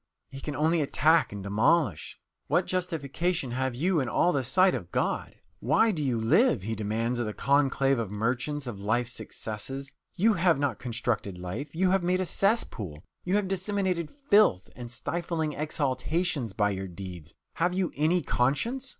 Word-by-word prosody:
He 135 0 -8
can 150 0 -4
only 160 +3 +2
attack 155 +3 +3
and 100 -1 -6
demolish. 110 - +1 0.3
"What - - +2
justification 170 -4 -2
have 130 0 -1
you 165 +4 +1
all 130 +7 +2
in - - -2
the 135 - +1
sight 185 +10 +4
of 90 -8 -5
God? - - -1 0.2
Why 155 - +3
do 155 -7 -2
you 125 -4 0
live?" 120 - +3
he 110 +3 -2
demands 110 +3 -1
of 120 - -1
the 105 - -5
conclave 135 -1 +2
of 115 -4 -2
merchants, 125 +7 -2
of 115 -5 -6
life's 115 +4 0
successes. 135 +6 -6 0.2
"You 220 +5 +4
have 175 -4 +3
not 140 -5 -1
constructed 115 -5 -2
life 110 - -6
you 185 +2 +2
have 195 0 +3
made 180 +1 +1
a 185 - 0
cesspool! 110 - 0 0.2
You 180 +2 0
have 205 -2 +1
disseminated 190 -3 -1
filth 210 - +2
and 120 -1 -8
stifling 160 +4 -2
exhalations 145 - -1
by 105 +1 +1
your 95 0 -4
deeds. 90 -3 -9 0.2
Have 175 +3 +1
you 185 -2 0
any 160 +4 +2
conscience? 230 - 0
140 Hz, 170 wpm, -28 LUFS, 115-175 Hz, 0.3 s, sight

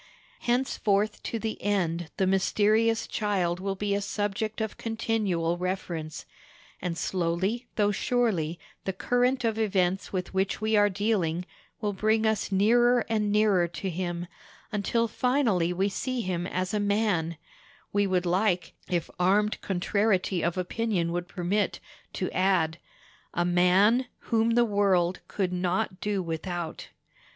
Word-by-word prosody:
Henceforth 215 -4 +1
to 230 - -3
the 220 0 -4
end 175 -5 0
the 190 - +2
mysterious 215 +4 +2
Child 185 -5 -1
will 195 +1 -2
be 200 +1 -1
a 200 - 0
subject 210 +2 -2
of 220 -1 -2
continual 205 -7 -1
reference; 175 -4 -4 0.6
and 170 -2 -3
slowly 190 +8 -1
though 205 -1 +3
surely 195 -8 0 0.3
the 190 - -1
current 245 +5 +1
of 225 -1 0
events 190 -3 +1
with 185 -1 -3
which 190 +1 0
we 215 +1 +1
are 205 0 +5
dealing 185 -4 0 0.4
will 210 -2 -1
bring 220 +3 +2
us 220 -2 0
nearer 240 +5 +4
and 210 -2 +1
nearer 205 -4 +3
to 185 +2 -4
him, 175 0 -3 0.5
until 230 +2 +1
finally 230 -8 +1
we 190 +3 +1
see 250 +5 -2
him 180 -3 -2
a 185 +3 -1
man—we 200 -1 -1
would 185 -1 +1
like, 180 -1 +1 0.2
if 175 -3 0
armed 205 +4 +2
contrariety 190 -1 +1
of 170 +2 0
opinion 185 -2 -1
would 175 +1 -2
permit 195 +3 0
it, - - -12 0.3
to 185 - -2
add—A 175 -1 -1
MAN 185 +8 +4 0.2
WHOM 230 0 +3
THE 240 0 +5
WORLD 190 -4 +2
COULD 185 -3 -1
NOT 185 +2 -1
DO 205 -2 -1
WITHOUT. 170 0 -4
195 Hz, 135 wpm, -27 LUFS, 180-220 Hz, 0.6 s, are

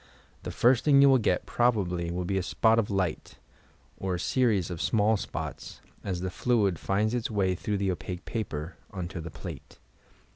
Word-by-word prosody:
The - - -6
first 120 0 +3
thing 140 -2 +5
you 140 - +7
will 130 -1 +5
get, 100 -5 0
probably, 95 -8 +1
will 90 +1 -3
be 95 +2 0
a - - -1
spot 110 +5 +3
of 110 - 0
light, 95 -5 -2 0.6
or 95 -1 -2
a - - -4
series 105 -5 +1
of 85 - -4
small 110 0 +3
spots, 100 - -6 0.2
as 90 -3 -3
the 95 0 -3
fluid 100 -7 +1
finds 105 +3 0
its 120 -2 -1
way 100 -4 +1
through 100 +3 -2
the 100 -1 0
opaque 90 0 -6
paper, 80 -7 -4
unto 90 -2 -5
the 85 - -7
plate. - - -9
95 Hz, 185 wpm, -28 LUFS, 90-110 Hz, 0.6 s, you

